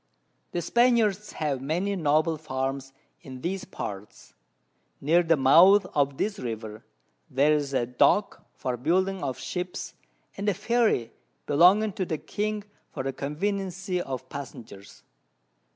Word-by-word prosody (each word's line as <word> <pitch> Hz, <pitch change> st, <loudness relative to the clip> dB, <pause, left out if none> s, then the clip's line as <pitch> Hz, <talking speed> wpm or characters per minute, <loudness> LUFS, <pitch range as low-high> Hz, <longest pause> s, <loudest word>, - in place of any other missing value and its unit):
The 175 Hz, -, -2 dB
Spaniards 220 Hz, -2 st, +2 dB
have 145 Hz, -4 st, -2 dB
many 175 Hz, +8 st, -1 dB
noble 155 Hz, -1 st, +2 dB
Farms 135 Hz, -2 st, -4 dB, 0.3 s
in 130 Hz, -1 st, -10 dB
these 190 Hz, +3 st, -3 dB
Parts. 100 Hz, -, -8 dB, 0.7 s
Near 165 Hz, +5 st, +3 dB
the 165 Hz, -2 st, +2 dB
Mouth 175 Hz, +9 st, +6 dB
of 140 Hz, -2 st, +1 dB
this 205 Hz, -1 st, -2 dB
River, 110 Hz, -3 st, -6 dB, 0.5 s
there's 145 Hz, +1 st, +2 dB
a 120 Hz, -, +1 dB
Dock 125 Hz, -, +2 dB
for 125 Hz, -2 st, -3 dB
building 185 Hz, +8 st, 0 dB
of 130 Hz, -, -3 dB
Ships, 180 Hz, 0 st, -5 dB, 0.4 s
and 200 Hz, +1 st, -1 dB
a 200 Hz, -, 0 dB
Ferry 215 Hz, -, +1 dB, 0.3 s
belonging 190 Hz, +8 st, +4 dB
to 190 Hz, -2 st, -2 dB
the 160 Hz, -, -2 dB
King 210 Hz, +5 st, -3 dB, 0.3 s
for 135 Hz, -, -5 dB
the 135 Hz, 0 st, -3 dB
Conveniency 185 Hz, +5 st, -2 dB
of 130 Hz, -6 st, -6 dB
Passengers. 115 Hz, -8 st, -10 dB
160 Hz, 130 wpm, -26 LUFS, 135-195 Hz, 0.7 s, Mouth